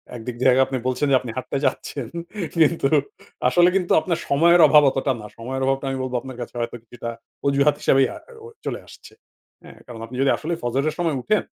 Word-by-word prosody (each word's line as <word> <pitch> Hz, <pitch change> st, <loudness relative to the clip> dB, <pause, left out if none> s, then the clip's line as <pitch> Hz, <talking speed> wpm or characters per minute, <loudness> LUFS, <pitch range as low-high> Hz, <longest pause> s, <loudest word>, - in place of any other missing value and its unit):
একদিক 120 Hz, +1 st, -6 dB
জায়গায় 130 Hz, 0 st, +5 dB
আপনি 130 Hz, -, -2 dB
বলছেন 130 Hz, +3 st, 0 dB
যে -, -, +6 dB
আপনি 120 Hz, -3 st, -6 dB
হাঁটতে 130 Hz, +2 st, -3 dB
চাচ্ছেন। 130 Hz, -1 st, -2 dB, 0.5 s
কিন্তু, 165 Hz, -3 st, +3 dB, 0.6 s
আসলে 175 Hz, +4 st, +5 dB
কিন্তু 180 Hz, -2 st, 0 dB
আপনার 170 Hz, 0 st, -2 dB
সময়ের 170 Hz, +5 st, +5 dB
অভাব 150 Hz, -1 st, +6 dB
অতটা 135 Hz, +1 st, -1 dB
না। -, -, -9 dB
সময়ের 130 Hz, +3 st, -5 dB
অভাবটা 135 Hz, +1 st, 0 dB
আমি 135 Hz, -, -2 dB
বলবো 130 Hz, -1 st, -4 dB
আপনার 130 Hz, -1 st, -9 dB
কাছে 120 Hz, -, -7 dB
হয়তো 120 Hz, 0 st, -3 dB
কিছুটা 120 Hz, 0 st, -8 dB, 0.4 s
অজুহাত 140 Hz, +1 st, +3 dB
হিসেবেই 135 Hz, 0 st, +4 dB
আ -, -, -8 dB, 0.3 s
অ -, -, -9 dB, 0.2 s
চলে -, -, -3 dB
আসছে। -, -, -15 dB, 0.5 s
হ্যাঁ? -, -, -14 dB
কারণ 115 Hz, -2 st, -9 dB
আপনি 120 Hz, +2 st, -10 dB
যদি 135 Hz, -, +3 dB
আসলে 165 Hz, +3 st, -3 dB
ফজরের 135 Hz, +5 st, 0 dB
সময় 165 Hz, -4 st, 0 dB
উঠেন, 215 Hz, -, +1 dB
135 Hz, 195 wpm, -22 LUFS, 125-150 Hz, 0.6 s, যে